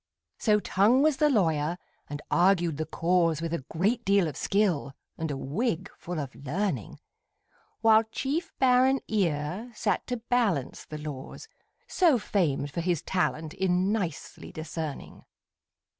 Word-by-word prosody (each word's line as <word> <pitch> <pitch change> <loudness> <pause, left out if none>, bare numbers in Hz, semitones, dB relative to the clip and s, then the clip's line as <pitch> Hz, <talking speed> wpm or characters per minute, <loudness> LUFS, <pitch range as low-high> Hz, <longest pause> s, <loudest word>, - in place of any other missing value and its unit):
So 210 -2 +3
Tongue 215 +7 +3
was 305 -3 +3
the 300 - +4
lawyer, 165 - +1 0.3
and 145 +1 -6
argued 175 -4 +3
the 155 0 -3
cause 165 -1 +1
With 165 0 -3
a 170 - -2
great 210 +8 0
deal 200 -3 +3
of 150 - -5
skill, 185 -9 0 0.2
and 160 -1 -3
a 140 - -3
wig 165 - -2
full 175 -2 -5
of 140 -3 -5
learning; 145 - -3 0.8
While 220 -1 +6
chief 280 +9 -3
baron 260 +1 +4
Ear 185 +2 -1
sat 210 -3 -1
to 250 - -2
balance 225 - 0
the 155 - -7
laws, 150 - -7 0.4
So 335 -8 +3
famed 160 -10 0
for 170 - -2
his 175 -3 0
talent 160 -4 -1
in 185 +1 +1
nicely 185 -9 -4
discerning. 155 -2 -6
180 Hz, 145 wpm, -28 LUFS, 155-220 Hz, 0.8 s, While